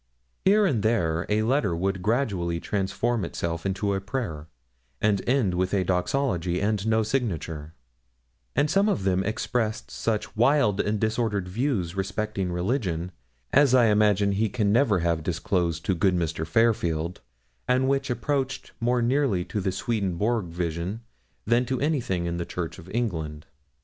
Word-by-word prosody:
Here 205 Hz, +2 st, +5 dB
and 130 Hz, -, +1 dB
there 90 Hz, -7 st, +1 dB
a 105 Hz, +1 st, +2 dB
letter 125 Hz, -, +1 dB
would 95 Hz, +2 st, -1 dB
gradually 100 Hz, -7 st, 0 dB
transform 105 Hz, +5 st, -1 dB
itself 85 Hz, +1 st, -3 dB
into 100 Hz, +1 st, 0 dB
a 95 Hz, -, -1 dB
prayer, 95 Hz, -, -4 dB, 0.5 s
and 105 Hz, -2 st, +2 dB
end 125 Hz, -8 st, +2 dB
with 95 Hz, +2 st, 0 dB
a 95 Hz, -, +2 dB
doxology 90 Hz, -1 st, 0 dB
and 105 Hz, 0 st, 0 dB
no 110 Hz, 0 st, +3 dB
signature; 85 Hz, -, -3 dB, 0.8 s
and 145 Hz, +3 st, +3 dB
some 195 Hz, +6 st, +3 dB
of 100 Hz, -, 0 dB
them 95 Hz, 0 st, +2 dB
expressed 110 Hz, +1 st, -2 dB
such 110 Hz, -2 st, -2 dB
wild 115 Hz, -4 st, +3 dB
and 105 Hz, 0 st, -1 dB
disordered 110 Hz, -3 st, 0 dB
views 100 Hz, -, -1 dB
respecting 100 Hz, -1 st, -2 dB
religion, 90 Hz, -, -1 dB, 0.4 s
as 140 Hz, -2 st, +5 dB
I 120 Hz, -3 st, +5 dB
imagine 105 Hz, -1 st, +3 dB
he 105 Hz, +2 st, +1 dB
can 105 Hz, -1 st, +1 dB
never 110 Hz, -6 st, +3 dB
have 85 Hz, -1 st, +1 dB
disclosed 85 Hz, 0 st, -1 dB
to 95 Hz, -, +2 dB
good 95 Hz, +1 st, +2 dB
Mr. 80 Hz, -2 st, -2 dB
Fairfield, 85 Hz, -5 st, +1 dB, 0.5 s
and 130 Hz, +1 st, +2 dB
which 135 Hz, 0 st, 0 dB
approached 135 Hz, +2 st, -2 dB
more 120 Hz, +1 st, +1 dB
nearly 120 Hz, -8 st, +1 dB
to 105 Hz, -, -3 dB
the 95 Hz, -, 0 dB
Swedenborg 105 Hz, 0 st, -1 dB
visions 85 Hz, +5 st, -3 dB, 0.4 s
than 120 Hz, +3 st, +3 dB
to 130 Hz, 0 st, -1 dB
anything 125 Hz, -, 0 dB
in 85 Hz, 0 st, -2 dB
the 85 Hz, -, -3 dB
Church 85 Hz, -3 st, -5 dB
of 90 Hz, -, -12 dB
England. 80 Hz, -10 st, -3 dB
100 Hz, 155 wpm, -26 LUFS, 90-120 Hz, 0.8 s, Here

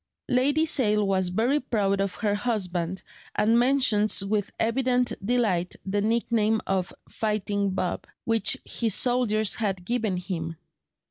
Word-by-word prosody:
Lady 280 Hz, +5 st, +2 dB
Sale 210 Hz, -9 st, +2 dB
was 190 Hz, -2 st, +1 dB
very 235 Hz, +10 st, +1 dB
proud 200 Hz, -6 st, 0 dB
of 195 Hz, -1 st, -2 dB
her 210 Hz, -2 st, 0 dB
husband, 190 Hz, -5 st, -2 dB, 0.3 s
and 225 Hz, +2 st, +3 dB
mentions 235 Hz, -6 st, +3 dB
with 205 Hz, 0 st, -1 dB
evident 250 Hz, +1 st, +1 dB
delight 200 Hz, -6 st, 0 dB
the 200 Hz, +1 st, -1 dB
nickname 220 Hz, 0 st, +1 dB
of 190 Hz, -2 st, -1 dB, 0.2 s
"Fighting 205 Hz, -2 st, -1 dB
Bob," 185 Hz, -1 st, -3 dB, 0.2 s
which 230 Hz, +4 st, +2 dB
his 225 Hz, -4 st, 0 dB
soldiers 225 Hz, -4 st, +2 dB
had 195 Hz, -5 st, -2 dB
given 225 Hz, -5 st, -1 dB
him. 165 Hz, -3 st, -4 dB
215 Hz, 130 wpm, -26 LUFS, 195-240 Hz, 0.3 s, and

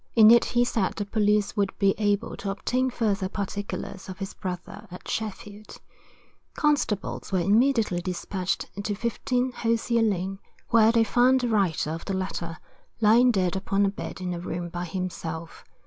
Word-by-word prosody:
In 220 Hz, -1 st, +8 dB
it 235 Hz, 0 st, +6 dB
he 245 Hz, 0 st, +2 dB
said 220 Hz, -5 st, 0 dB
the 205 Hz, -, -3 dB
police 210 Hz, 0 st, +1 dB
would 200 Hz, -2 st, -1 dB
be 195 Hz, -1 st, +3 dB
able 205 Hz, 0 st, 0 dB
to 200 Hz, -, -4 dB
obtain 250 Hz, +6 st, 0 dB
further 210 Hz, -6 st, -1 dB
particulars 200 Hz, -1 st, -5 dB
of 185 Hz, -, -7 dB
his 195 Hz, 0 st, -5 dB
brother 190 Hz, +3 st, -6 dB
at 180 Hz, -, -10 dB
Sheffield. 210 Hz, -1 st, -5 dB, 0.8 s
Constables 285 Hz, -13 st, 0 dB
were 190 Hz, -, +2 dB
immediately 210 Hz, 0 st, +2 dB
despatched 185 Hz, +1 st, -2 dB, 0.2 s
to 205 Hz, 0 st, -2 dB
15, 245 Hz, +3 st, -1 dB
Hosier 230 Hz, 0 st, +1 dB
lane, 195 Hz, -3 st, 0 dB, 0.3 s
where 225 Hz, -2 st, +6 dB
they 230 Hz, -1 st, +4 dB
found 250 Hz, +3 st, +3 dB
the 245 Hz, -, 0 dB
writer 190 Hz, -8 st, +1 dB
of 165 Hz, +1 st, -5 dB
the 195 Hz, -, -2 dB
letter 175 Hz, -3 st, -4 dB, 0.4 s
lying 230 Hz, +3 st, +5 dB
dead 190 Hz, -5 st, +1 dB
upon 195 Hz, +1 st, +1 dB
a -, -, +2 dB
bed 165 Hz, -4 st, -7 dB
in 180 Hz, -1 st, -2 dB
a 175 Hz, -, -4 dB
room 175 Hz, 0 st, -4 dB
by 175 Hz, +1 st, -4 dB
himself. 165 Hz, -2 st, -5 dB
200 Hz, 165 wpm, -26 LUFS, 185-225 Hz, 0.8 s, In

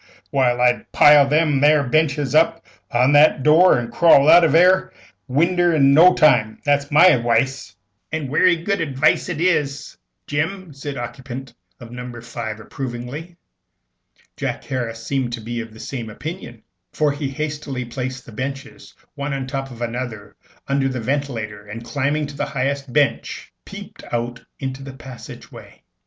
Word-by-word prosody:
Why, 125 Hz, -3 st, +2 dB
I'd 125 Hz, 0 st, +1 dB
pile 145 Hz, -1 st, +6 dB
them 150 Hz, -2 st, +2 dB
'ere 150 Hz, 0 st, +5 dB
benches 145 Hz, 0 st, 0 dB
up 165 Hz, +1 st, +2 dB, 0.2 s
agin 125 Hz, +1 st, +2 dB
that 145 Hz, +2 st, +7 dB
'ere -, -, -14 dB
door, 160 Hz, +4 st, +5 dB
an' 120 Hz, -1 st, -4 dB
crawl 145 Hz, +2 st, +5 dB
out 175 Hz, -, +8 dB
of 160 Hz, -, +3 dB
that 165 Hz, +2 st, +6 dB
'erc 185 Hz, +1 st, +2 dB, 0.3 s
winder 170 Hz, +5 st, +2 dB
in 140 Hz, -2 st, +4 dB
no 175 Hz, +5 st, +6 dB
time. 110 Hz, -8 st, +3 dB
That's 145 Hz, 0 st, +1 dB
my 160 Hz, +5 st, +6 dB
adwice." 120 Hz, -3 st, 0 dB, 0.4 s
"And 155 Hz, -3 st, -3 dB
werry 170 Hz, +6 st, +3 dB
good 185 Hz, +3 st, -2 dB
adwice 145 Hz, +2 st, +1 dB
it 165 Hz, -4 st, -4 dB
is, 150 Hz, -6 st, -1 dB, 0.3 s
Jim," 160 Hz, +3 st, -3 dB
said 140 Hz, +1 st, -7 dB
the 120 Hz, -, -4 dB
occupant 130 Hz, +1 st, -8 dB, 0.3 s
of 120 Hz, -2 st, -12 dB
No. 125 Hz, -1 st, -8 dB
5, 115 Hz, -2 st, -6 dB
approvingly. 135 Hz, +8 st, -7 dB, 1.0 s
Jack -, -, -4 dB
Harris 115 Hz, -3 st, -5 dB
seemed 130 Hz, -3 st, -2 dB
to 120 Hz, -, -4 dB
be 115 Hz, +1 st, -5 dB
of 115 Hz, -1 st, -10 dB
the 110 Hz, -, -15 dB
same 120 Hz, -3 st, -6 dB
opinion, 135 Hz, -, -8 dB, 0.3 s
for 150 Hz, -1 st, +1 dB
he 145 Hz, -1 st, -4 dB
hastily 145 Hz, -2 st, -5 dB
placed 125 Hz, +1 st, -6 dB
the -, -, -12 dB
benches 135 Hz, +4 st, -7 dB, 0.2 s
one 140 Hz, -1 st, -4 dB
on 135 Hz, -, -4 dB
the 130 Hz, -, -8 dB
top 135 Hz, -1 st, -4 dB
of 120 Hz, -2 st, -7 dB
another 120 Hz, -3 st, -6 dB, 0.3 s
under 135 Hz, -1 st, 0 dB
the 130 Hz, -1 st, -4 dB
ventilator, 115 Hz, -5 st, -4 dB
and, 115 Hz, +3 st, -8 dB
climbing 145 Hz, +3 st, -1 dB
up 145 Hz, -, -5 dB
on -, -, -13 dB
the 145 Hz, -, -1 dB
highest 140 Hz, -1 st, -3 dB
bench, 145 Hz, +1 st, -1 dB
peeped -, -, -11 dB
out 120 Hz, 0 st, -3 dB, 0.2 s
into 135 Hz, -1 st, -5 dB
the 135 Hz, -1 st, -9 dB
passage 130 Hz, -1 st, -11 dB
way. -, -, -14 dB
135 Hz, 175 wpm, -20 LUFS, 120-150 Hz, 1.0 s, out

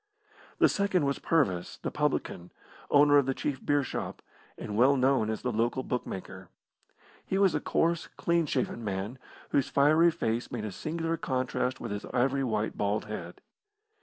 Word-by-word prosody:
The -, -, +6 dB
second 200 Hz, -6 st, +1 dB
was 140 Hz, 0 st, -1 dB
Purvis, 100 Hz, -, 0 dB
the -, -, -4 dB
publican, 85 Hz, +1 st, -2 dB, 0.4 s
owner 145 Hz, 0 st, +6 dB
of 135 Hz, -, 0 dB
the 135 Hz, -, 0 dB
chief 135 Hz, -3 st, -3 dB
beer 145 Hz, -1 st, +2 dB
shop, 130 Hz, -, -5 dB, 0.3 s
and 105 Hz, -, -5 dB
well 130 Hz, +5 st, +5 dB
known 130 Hz, -4 st, +2 dB
as 110 Hz, -, -3 dB
the 125 Hz, -, 0 dB
local 120 Hz, +3 st, 0 dB
bookmaker. 120 Hz, -7 st, -5 dB, 0.7 s
He 190 Hz, -, -2 dB
was 195 Hz, -4 st, +4 dB
a -, -, +1 dB
coarse, 165 Hz, +2 st, 0 dB
clean 170 Hz, -2 st, +1 dB
shaven 125 Hz, -4 st, -2 dB
man, 100 Hz, +4 st, -4 dB, 0.3 s
whose 140 Hz, -1 st, +1 dB
fiery 155 Hz, +4 st, +5 dB
face 115 Hz, -6 st, -2 dB
made 115 Hz, -3 st, -4 dB
a 105 Hz, -, -4 dB
singular 165 Hz, -, -3 dB
contrast 130 Hz, -2 st, -1 dB
with -, -, -5 dB
his 105 Hz, 0 st, -4 dB
ivory 135 Hz, +2 st, +1 dB
white 110 Hz, -3 st, -1 dB
bald 105 Hz, +1 st, -1 dB
head. 90 Hz, -5 st, -7 dB
130 Hz, 165 wpm, -29 LUFS, 110-150 Hz, 0.7 s, The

